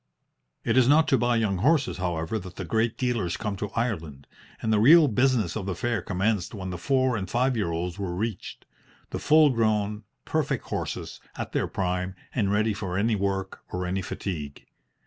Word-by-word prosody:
It 115 - +1
is 125 -2 +5
not 155 +3 +5
to 135 - +4
buy 120 0 +2
young 105 -5 +1
horses, 145 - +2
however, 90 +3 -2
that 95 -1 -10
the 95 - -5
great 110 +6 0
dealers 120 -9 -1
come 105 -2 -3
to 105 +1 -3
Ireland, 80 - -3 0.3
and 110 - 0
the 105 - +4
real 155 +7 +8
business 125 -5 +2
of 100 -3 -4
the 95 - -2
fair 120 -4 -1
commenced 100 +2 -1
when 95 -2 -5
the 90 - -5
four 130 +2 +2
and 95 -4 -4
five 125 +4 +1
year 105 -6 0
olds 85 +3 -3
were 90 -3 -3
reached; 105 +1 -4 0.5
the - - -3
full 155 -1 +5
grown, 105 -3 0 0.2
perfect - - -1
horses, - - -4 0.2
at - - -4
their - - 0
prime, 90 0 -2 0.2
and 100 -6 +1
ready 110 +1 +2
for 95 -3 -4
any 110 +2 +2
work 95 -1 -2
or 90 0 -2
any 95 +2 -1
fatigue. 80 -6 -5
105 Hz, 190 wpm, -26 LUFS, 90-120 Hz, 0.5 s, real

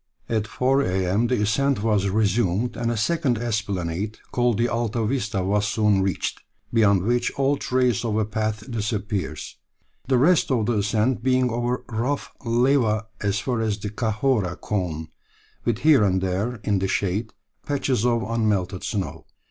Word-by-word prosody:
At 110 -2 -1
four 130 +4 +2
a.m. 95 +1 +1
the 120 -4 +1
ascent 135 +2 +1
was 105 -3 +2
resumed, 105 +1 +1
and 115 -1 -1
a 120 - -1
second 140 +1 +1
esplanade, 105 -3 -2
called 120 -3 +1
the 120 - +2
Alta 115 -1 -1
Vista, 105 -6 -1
was 105 +2 +1
soon 105 -2 +2
reached, 95 -1 -2 0.3
beyond 100 -5 +4
which 120 +3 +1
all 140 +1 +2
trace 125 -4 +1
of 110 -3 -1
a 110 - +2
path 110 +1 -3
disappears, 105 -7 -3 0.5
the 130 -1 +3
rest 160 +7 +4
of 120 -5 +1
the 115 -2 +1
ascent 110 +4 +1
being 130 0 +2
over 120 +2 -1
rough 125 +5 -2
lava 120 -2 +2 0.2
as 100 -1 0
far 120 -1 -1
as 110 -2 0
the 105 0 -5
Chahorra 110 -3 0
Cone, 80 -6 -3 0.6
with 120 -3 +1
here 150 -7 +5
and 95 -2 +2
there, 95 +6 -1
in 100 -2 +1
the 95 - 0
shade, 100 +4 -1 0.3
patches 135 -5 0
of 120 -2 +2
unmelted 105 -5 0
snow. 100 -4 -4
110 Hz, 160 wpm, -24 LUFS, 100-120 Hz, 0.6 s, here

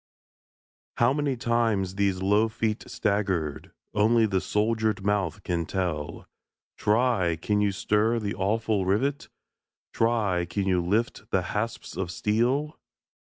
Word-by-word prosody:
How 120 +2 +4
many 145 -3 -1
times 115 -5 +1
these 95 -2 0
low 105 +3 +3
feet 110 0 -2
staggered, 95 -8 -1 0.2
Only 110 +2 +4
the 95 -3 0
soldered 110 -1 0
mouth 100 -2 0
can 85 -2 -2
tell; 85 -6 -3 0.5
Try! 105 -6 +2
can 105 +6 0
you 100 -1 +2
stir 105 +4 +1
the 105 -3 -2
awful 105 +1 0
rivet? 135 +9 0 0.6
Try! 105 -7 +1
can 95 +3 -2
you 90 -2 +2
lift 110 +3 -1
the 95 - +1
hasps 115 +3 -3
of 95 -2 -2
steel? 120 - 0
105 Hz, 125 wpm, -26 LUFS, 95-115 Hz, 0.6 s, How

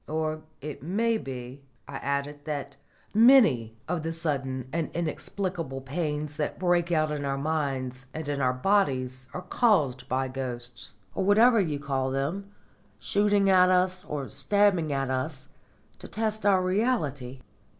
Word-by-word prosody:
"Or 155 0 -2 0.2
it 150 +1 -6
may 220 +8 0
be," 130 -1 -7 0.3
I 140 0 -6
added, 140 +1 -3
"that 150 -2 -4 0.4
many 210 - +5
of 175 -1 -1
the 165 +1 -3
sudden 135 -6 -2
and 165 -1 -1
inexplicable 170 -3 -3
pains 150 +1 -3
that 150 - -2
break 175 -1 +1
out 155 -2 +2
in 150 -1 -3
our 135 -1 -1
minds 135 -4 -2
and 155 0 -6
in 145 -1 -1
our 130 -1 +3
bodies 130 -5 0
are 180 - -6
caused 150 - +1
by 130 +1 0
ghosts, 125 -3 -6 0.2
or - - -1
whatever 220 +3 +5
you 155 -6 -1
call 135 -2 -1
them, 150 +10 -2 0.5
shooting 205 -1 +2
at 185 -1 +6
us, 185 0 +2
or 145 -6 -4
stabbing 170 +3 +2
us, 130 0 -2 0.5
to - - -7
test 215 -1 -2
our 190 -2 +4
reality." 155 - -1
150 Hz, 145 wpm, -27 LUFS, 135-185 Hz, 0.5 s, at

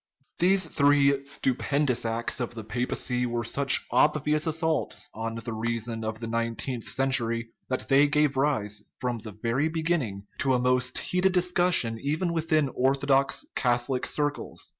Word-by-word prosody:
These 185 +1 +4
three 140 -2 +3
stupendous 135 -2 0
acts 115 +4 -2
of 120 -1 -4
the 110 - -6
papacy 125 +2 -1
were 120 0 -2
such 135 +4 +3
obvious 150 +4 +2
assaults 160 -1 -1
on 115 +1 -4
the 115 0 -5
reason 115 0 -3
of 110 0 -4
the 115 - -5
nineteenth 115 +1 -2
cen 135 0 0
tury 115 -2 0 0.2
that 130 - -2
they 140 +2 +5
gave 150 -1 +2
rise, 110 -7 0 0.2
from 125 -2 -2
the 110 0 -9
very 130 +7 +1
beginning, 155 - -2
to 130 -2 +2
a - - +1
most 125 0 +1
heated 180 +1 +1
discussion 175 -10 +2
even 160 +5 -1
within 155 -3 +1
orthodox 135 +1 +2
Catho 120 0 0
lic 130 -2 -1
circles. 145 0 -2
130 Hz, 155 wpm, -27 LUFS, 115-150 Hz, 0.2 s, they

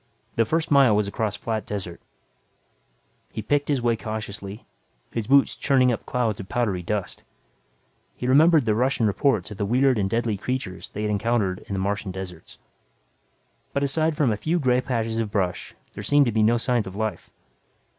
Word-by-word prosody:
The 115 - +3
first 160 +7 -1
mile 135 -6 +6
was 105 -1 +1
across 105 0 -2
flat 110 -2 -3
desert. 95 -4 -5 1.3
He - - -5
picked 145 0 +1
his 140 -5 0
way 120 -1 +3
cautiously, 110 -2 -6 0.5
his 115 -3 -3
boots 140 +1 +4
churning 130 -3 +3
up 115 - -4
clouds 115 -5 -1
of 95 - -8
powdery 105 -6 0
dust. 100 +2 -3 0.9
He - - -5
remembered 150 +2 +5
the 110 - +2
Russian 125 +1 +1
reports 110 -1 +1
of 105 - -7
the 105 - -1
weird 130 +1 +3
and 95 -1 0
deadly 115 -1 0
creatures 115 -4 -4
they 105 - -5
had 105 - 0
encountered 100 -2 0
in - - -4
the 95 - -1
Martian 100 +1 -2
deserts. 90 -3 -8 1.2
But 140 - 0
aside 155 +2 +1
from 145 -7 +3
a 105 - -1
few 160 +11 0
gray 125 -5 +2
patches 115 -3 -2
of 110 -2 -1
brush 95 -4 -2 0.2
there - - -7
seemed 145 0 +4
to 120 - 0
be 110 0 +1
no 115 +3 +4
sign 120 0 +1
of 95 - -8
life. 110 -4 -3
115 Hz, 185 wpm, -24 LUFS, 100-130 Hz, 1.3 s, mile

